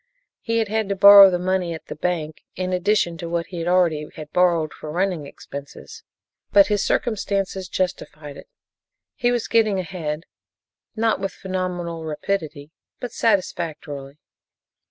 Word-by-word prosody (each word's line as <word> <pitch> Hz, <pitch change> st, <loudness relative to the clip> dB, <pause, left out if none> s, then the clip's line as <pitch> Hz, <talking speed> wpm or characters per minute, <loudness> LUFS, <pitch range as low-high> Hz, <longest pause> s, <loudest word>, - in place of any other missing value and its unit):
He 230 Hz, -1 st, -2 dB
had 225 Hz, -1 st, +1 dB
had 220 Hz, -1 st, -1 dB
to 200 Hz, -, 0 dB
borrow 200 Hz, 0 st, +10 dB
the 180 Hz, -, 0 dB
money 180 Hz, -1 st, -1 dB
at 160 Hz, -, -11 dB
the -, -, -7 dB
bank 155 Hz, -2 st, -3 dB
in 185 Hz, 0 st, -2 dB
addition 180 Hz, -2 st, +1 dB
to 170 Hz, -, -5 dB
what 170 Hz, 0 st, -1 dB
he 170 Hz, -2 st, -5 dB
already 170 Hz, -4 st, +2 dB
had 150 Hz, -1 st, -9 dB
borrowed 170 Hz, -4 st, +2 dB
for 155 Hz, -, -9 dB
running 175 Hz, -2 st, -1 dB
expenses, 140 Hz, 0 st, -10 dB, 0.5 s
but 200 Hz, -1 st, +7 dB
his 205 Hz, -1 st, +1 dB
circumstances 195 Hz, -4 st, -1 dB
justified 155 Hz, -5 st, -4 dB
it. -, -, -12 dB, 0.7 s
He 240 Hz, -2 st, 0 dB
was 240 Hz, -2 st, -1 dB
getting 220 Hz, -3 st, +2 dB
ahead, 165 Hz, -4 st, -4 dB, 0.7 s
not 225 Hz, -2 st, +1 dB
with 195 Hz, 0 st, -3 dB
phenomenal 180 Hz, -3 st, -4 dB
rapidity, 155 Hz, -2 st, -4 dB, 0.3 s
but 245 Hz, -, -5 dB
satisfactorily. 160 Hz, -10 st, -2 dB
180 Hz, 145 wpm, -22 LUFS, 160-200 Hz, 0.7 s, borrow